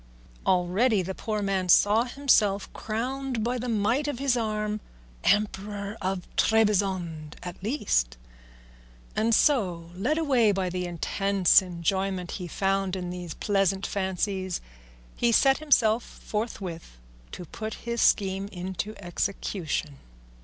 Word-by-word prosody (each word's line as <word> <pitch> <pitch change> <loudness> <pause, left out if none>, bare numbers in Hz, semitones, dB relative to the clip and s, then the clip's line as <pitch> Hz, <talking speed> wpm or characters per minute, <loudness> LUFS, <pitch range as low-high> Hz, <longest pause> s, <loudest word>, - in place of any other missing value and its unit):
Already 190 +4 +3
the 190 +2 -4
poor 215 +1 -3
man 190 -2 -1
saw 210 +6 +5
himself 230 -7 +2
crowned 250 +2 -3
by 245 +2 -1
the 245 +1 -3
might 230 +7 +1
of 290 - -2
his 270 -1 +1
arm 215 -2 -1 0.4
Emperor 205 0 0
of 185 -1 -2
Trebizond 190 -8 +1
at 180 0 -7
least; 195 - 0 1.0
and 225 +1 +3
so, 180 - +2
led 235 - 0
away 260 -9 +3
by 190 -2 -1
the 180 0 -2
intense 195 +2 +3
enjoyment 185 +1 -2
he 180 -3 -5
found 195 +1 0
in 180 -1 -4
these 175 -3 -6
pleasant 195 -1 +1
fancies, 190 -1 -2 0.6
he 235 - +2
set 270 +3 +4
himself 240 -7 +3
forthwith 190 - -6 0.3
to 180 - -7
put 220 +6 -6
his 235 -1 -1
scheme 195 -1 +2
into 190 +2 -5
execution. 175 -5 -3
200 Hz, 125 wpm, -27 LUFS, 180-225 Hz, 1.0 s, saw